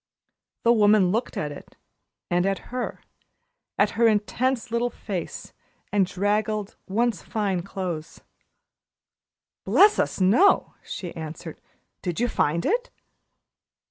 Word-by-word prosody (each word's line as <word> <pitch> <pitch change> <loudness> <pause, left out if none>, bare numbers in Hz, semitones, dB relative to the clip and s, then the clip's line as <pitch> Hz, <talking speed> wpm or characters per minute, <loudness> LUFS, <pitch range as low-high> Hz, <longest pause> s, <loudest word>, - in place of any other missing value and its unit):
The 235 - +5
woman 205 -4 +5
looked 230 +5 -2
at 150 -1 -2
it 145 - -11 0.6
and 175 +2 +2
at 195 +3 -3
her 250 -1 -4 0.7
at - - +3
her 230 0 +3
intense 225 +3 0
little 235 +1 +1
face 195 -6 -6 0.4
and 200 -3 +3
draggled, 210 +2 -1
once 220 -1 0
fine 200 -5 -1
clothes. 175 -4 -5 1.4
"Bless 420 +1 +5
us - - 0
no," 225 - +4
she 175 -3 -6
answered. 160 0 -7 0.4
"Did 175 0 -3
you 245 - +2
find 170 -2 0
it?" - - 0
205 Hz, 115 wpm, -25 LUFS, 180-235 Hz, 1.4 s, The